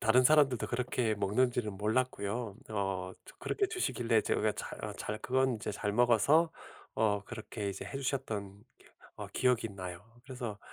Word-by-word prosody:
다른 125 +3 +5
사람들도 145 -4 +5
그렇게 120 -2 0
먹는지는 105 +2 +1
몰랐고요 110 0 -1
어 95 -3 -2
저 - - -14
그렇게 400 - 0
주시길래 120 - +1
제가 110 0 +1
잘 - - -7
아 105 - -3
잘 105 +1 -4
그건 130 +1 +2
이제 105 - -4
잘 105 0 -2
먹어서 125 +8 +4 0.4
어 105 -2 +2
그렇게 110 -3 -5
이제 100 - -5
해주셨던 110 -8 -3 0.5
어 - - -5
기억이 125 -3 +2
나요. 90 -1 -7 0.2
그래서 125 -5 -5
110 Hz, 325 characters per minute, -32 LUFS, 105-125 Hz, 0.5 s, 다른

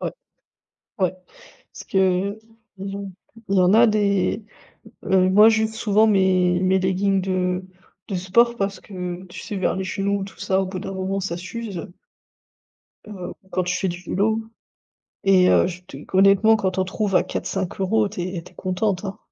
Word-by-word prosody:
Ouais - - -3 0.9
ouais. 185 -2 +1 0.6
Parce - - -10
que, 195 - -1 0.4
heu, - - -17 0.4
ils 195 +1 -5
ont 200 -1 -7 0.4
il 195 - +1
y - - +5
en 180 +1 +4
a 235 +1 +7
des, 205 0 +1 0.6
heu 185 -1 +3
Moi, 210 +3 +7
j'use 220 0 +1
souvent 215 0 +3
mes 185 -3 +3
mes 190 +1 +3
leggings 190 +1 +1
de 185 0 -1 0.4
de 195 - -3
sport 235 +7 +2
parce 195 -1 -2
que, 180 -2 -6
tu 175 - -10
sais, 205 - -6
vers 190 - 0
les 190 - -2
genoux 200 +1 -1
et - - -2
tout 195 - -13
ça, 190 0 +1
au 190 - -1
bout 185 0 -5
d'un 195 - -6
moment, 190 +1 -2
ça 185 -3 -3
s'use. 190 0 -6 1.2
Heu, 190 -4 -7 0.2
quand 185 - 0
tu 180 +1 -1
fais 190 - -1
du 175 +1 -6
vélo 215 +5 0 0.8
et 185 -2 +5
heu, - - +5
je 180 0 -5
te 185 - -12 0.2
honnêtement, 195 +3 +6
quand 190 -4 -1
on 185 - +1
trouve 195 0 -2
à - - +5
4, - - -4
5€, 195 +3 0
tu 195 -3 -6
es 180 -2 -4
tu - - -15
es - - -26
contente, 185 +1 -1
hein. 195 - -5
190 Hz, 190 wpm, -22 LUFS, 185-200 Hz, 1.2 s, a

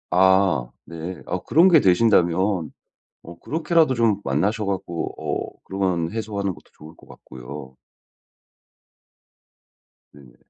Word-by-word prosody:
아 95 -7 +3 0.2
네. 85 +2 -7
어 90 +1 -3
그런 170 +5 +5
게 165 -3 +7
되신다면 95 - +2 0.5
어 85 0 -12
그렇게라도 160 - +1
좀 115 -4 +1
만나서 100 - 0
갖고 95 -3 -3
어 - - -5
그러면 90 -3 -2
해소하는 105 -3 -3
것도 75 -2 -19
좋을 80 +2 -13
것 - - -20
같고요. 65 +2 -11 2.4
네네. 65 -4 -17
95 Hz, 230 characters per minute, -22 LUFS, 80-105 Hz, 2.4 s, 게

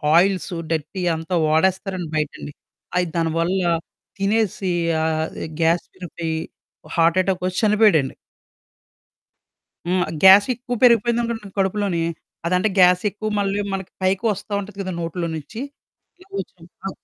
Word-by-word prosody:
Oils, 185 0 +2 0.2
dirty 160 +4 -2
అంతా 165 +3 -3
వాడేస్తారండి 185 +1 +1
బయటండి. 150 -1 -3 0.5
అయి 180 -1 +2
దానివల్ల 165 +3 0 0.6
తినేసి 200 -2 0 0.3
ఆ - - +1 0.6
గ్యాస్ 165 +1 +2
విరిపోయి 170 -3 -5 0.6
హార్ట్ 165 +1 +3
యటాకొచ్చి 185 -1 -1
చనిపోయాడండి. 210 -10 +4 1.7
హ్మ్. 180 0 +2 0.2
గ్యాస్ 195 +2 +9
ఎక్కువ 245 0 -5
పెరిగిపోయిందనుకోండి 235 -3 +2
కడుపులోని, 195 -3 0 0.4
అదంటే 180 +5 +2
గ్యాస్ 180 0 +6
ఎక్కువ 215 +2 -5
మళ్ళీ 200 0 0
మనకి 190 -1 -5
పైకి 190 +3 +1
వస్తా 200 +1 -6
ఉంటది 200 0 -8
కదా! 185 - -4
నోట్లో 170 +1 -3
నుంచి. 160 +9 -8 0.6
అలాగొచ్చి 380 - -7 0.2
ఆ! - - -1
185 Hz, 115 wpm, -22 LUFS, 170-205 Hz, 1.7 s, గ్యాస్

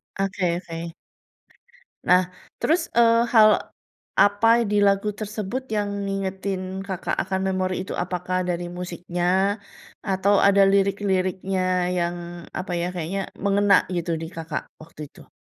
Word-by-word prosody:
Oke 190 -3 0
oke. 165 0 -6 1.1
Nah, 180 0 +4 0.3
terus, 330 +4 +2 0.2
eee, 230 0 +5
hal 215 -2 +8 0.7
apa 205 +2 +4 0.2
di 205 0 +1
lagu 200 +1 +2
tersebut 215 +4 -5
yang 210 -2 -1 0.2
ngingetin 190 -1 -3
Kakak 190 -2 -3
akan 190 0 -2
memori 185 0 -1
itu, - - -5
apakah 180 +1 -2
dari 175 -1 -2
musiknya, 180 +3 -1 0.4
atau 195 0 +2
ada 200 0 +5
lirik-liriknya 195 -1 +1 0.4
yang 175 0 0 0.3
apa, 185 - -5
ya, 170 +1 -1
kayaknya 180 +3 -3 0.2
mengena, 200 0 +4
gitu, 175 -1 -2
di 165 - -4
Kakak 160 -2 -4 0.2
waktu 155 -1 -13
itu? - - -17
190 Hz, 125 wpm, -24 LUFS, 180-200 Hz, 1.1 s, hal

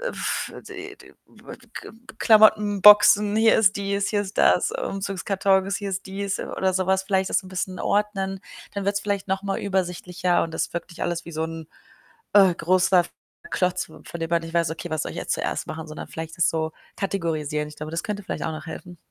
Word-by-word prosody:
äh, - - -5
äh, - - -14 0.8
K - - -8 0.3
Klamottenboxen, 210 -1 +6
hier 225 0 +5
ist 205 -2 +4
dies, 200 0 -1
hier 205 -1 +1
ist 195 0 -9
das - - +4
Umzugskartons, 195 - 0
hier 200 -1 -4
ist 190 +1 -4
dies 195 +1 -3
oder 190 -1 -1
so 185 -1 0
was. 190 0 +2
Vielleicht 190 -1 0
das - - +3
so 190 - -8
'n - - -10
bisschen 185 0 -3
ordnen. 195 -2 -1 0.3
Dann 200 -1 -3
wird's 200 0 0
vielleicht 200 -1 -2
noch 190 +1 -1
mal 195 -1 -2
übersichtlicher 180 -2 -1
und 165 - -4
das - - -2
wirkt 170 - -4
nicht 170 - -8
alles 175 -1 -2
wie 170 - -9
so 160 +1 -2
'n, 160 -1 -7 0.7
äh, 195 -3 +7
großer 180 +1 +3 0.5
Klotz, 180 0 0
von 160 - -15 0.2
dem 165 0 -3
man 170 0 +2
nicht 165 +1 -9
weiß, 170 -2 +2
okay, 165 +2 -6
was 155 -1 -1
soll - - -4
ich - - -10
jetzt - - -1
zuerst - - -3
machen, 160 0 -6
sondern 155 - -7
vielleicht 160 0 -7
das 170 - +4
so 160 -1 -1 0.2
kategorisieren. 155 -6 -2
Ich 150 - -13
glaube, 155 +1 -6
das 165 - -2
könnte 210 -1 -4
vielleicht - - -4
auch 160 - -2
noch 155 0 -8
helfen. 175 +2 -9
190 Hz, 205 wpm, -24 LUFS, 170-200 Hz, 0.8 s, äh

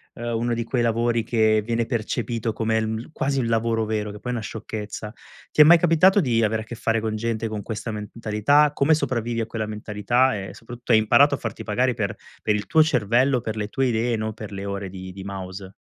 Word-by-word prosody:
uhm, 120 0 -4
uno 120 +1 0
di 115 - -2
quei 120 +1 -1
lavori 115 0 +1
che 110 -1 +2
viene 115 0 -1
percepito 115 -1 -2
come 110 0 0
l 110 - -1
mhmm, 110 +6 -5
quasi 135 -2 -1
un 125 - 0
lavoro 115 -1 +1
vero, 105 -1 -2
che 105 - -10
poi 125 +3 -4
è - - -2
una 115 - -4
sciocchezza. 105 0 -6 0.4
Ti - - +5
è - - +12
mai 170 +3 +8
capitato 175 +4 +4
di 120 -9 +2
avere 110 0 0
a - - -17
che 120 - -7
fare 115 -1 0
con 110 0 -2
gente 115 0 -2
con 110 -1 -4
questa 110 +2 -5
mentalità? 110 +7 +1
Come 150 +2 +3
sopravvivi 120 -5 -2
a - - -1
quella 110 -1 -4
mentalità 110 +4 0
e, 95 -1 -6
soprattutto, 120 +1 -7
hai - - +8
imparato 120 +7 +5
a - - -7
farti 115 -4 -6
pagare 125 +4 +1
per 105 -4 -3 0.3
per 105 - +1
il 105 -1 -3
tuo 155 +11 +4
cervello, 125 -1 +2
per 110 -1 -4
le 105 -1 -3
tue 135 +4 0
idee, 120 0 0
non 110 0 -3
per 110 -1 -9
le 100 0 -6
ore 100 -1 -4
di 95 0 -8
di 95 +1 -9
mouse? 95 0 -7
115 Hz, 235 wpm, -23 LUFS, 105-120 Hz, 0.4 s, è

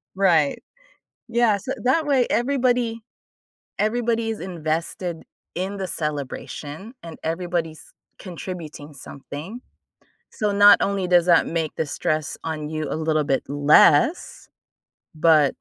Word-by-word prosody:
Right. 170 -7 +2 0.7
Yeah, 235 -3 +3
so 255 +7 -5
that 290 +5 +2
way, 265 -4 +2
everybody 245 -3 +1 0.8
everybody 230 +1 0
is 220 - -5
invested 170 0 -4 0.3
in 190 +3 -3
the 190 - -3
celebration 150 - -5
and 165 -1 -9
everybody's 165 -1 -3 0.3
contributing 170 -5 -8
something, 150 - -9 0.7
so 210 -1 -1
not 205 0 +7
only 195 -2 0
does 175 -1 +4
that 170 -2 +5
make 165 -2 -2
the 160 - 0
stress 155 +1 -2
on 155 -2 -4
you 155 -1 -3
a - - -2
little 155 -1 0
bit 135 -1 0
less, 145 - +3 0.7
but 155 -2 +5
175 Hz, 120 wpm, -23 LUFS, 155-215 Hz, 0.8 s, not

